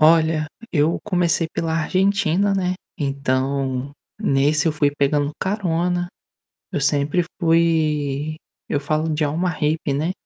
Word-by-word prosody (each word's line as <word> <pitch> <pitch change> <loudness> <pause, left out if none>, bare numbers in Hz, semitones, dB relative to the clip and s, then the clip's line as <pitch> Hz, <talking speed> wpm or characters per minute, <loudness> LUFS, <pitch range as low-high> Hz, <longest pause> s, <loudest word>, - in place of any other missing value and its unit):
Olha, 160 -1 +4 0.3
eu 155 +1 +2
comecei 175 -4 +1
pela 165 -1 -2
Argentina, 195 +2 +2
né, 185 -1 0 0.2
então, 135 -1 -1 0.3
nesse 145 +3 +2
eu 160 - +3
fui 145 -1 +2
pegando 145 0 +1
carona, 175 -3 0 0.6
eu 145 - -2
sempre 145 +4 +2 0.2
fui 155 -3 +1 0.3
eu 145 - 0
falo 155 +2 -1
de 155 +1 0
alma 165 +5 0
hippie, 155 -3 -1
né, 155 +5 0
155 Hz, 125 wpm, -21 LUFS, 145-170 Hz, 0.6 s, Olha